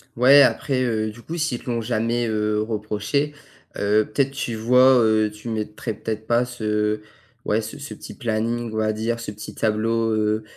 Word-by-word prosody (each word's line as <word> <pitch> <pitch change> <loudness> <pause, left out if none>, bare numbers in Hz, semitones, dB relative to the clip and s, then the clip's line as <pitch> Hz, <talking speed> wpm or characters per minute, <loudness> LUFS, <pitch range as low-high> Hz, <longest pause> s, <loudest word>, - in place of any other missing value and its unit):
Ouais 135 +4 +7
après, 130 0 +2
heu, 110 -3 -1
du 120 - -14
coup 165 +7 -6
s'ils 150 -6 -1
te - - -7
l'ont 115 -1 -1
jamais, 115 +1 0
heu, 105 -1 0
reproché, 110 +6 -2 0.4
heu, 105 +1 +2
peut-être 135 +4 +1
tu 125 -4 -3
vois, 125 +4 +5
heu, 110 -1 +3
tu 105 +2 -9
mettrais 110 0 -4
peut-être 110 +1 -5
pas 120 +2 +2
ce 105 -3 -1 0.4
ouais, 110 +2 +1
ce 110 - -7
ce 145 0 -8
petit - - -10
planning, 115 -1 -2
on - - -3
va 110 0 +1
dire, 115 +2 -2
ce 115 - -6
petit 105 +1 -9
tableau, 115 +1 0
heu 110 0 0
110 Hz, 185 wpm, -23 LUFS, 110-120 Hz, 0.4 s, Ouais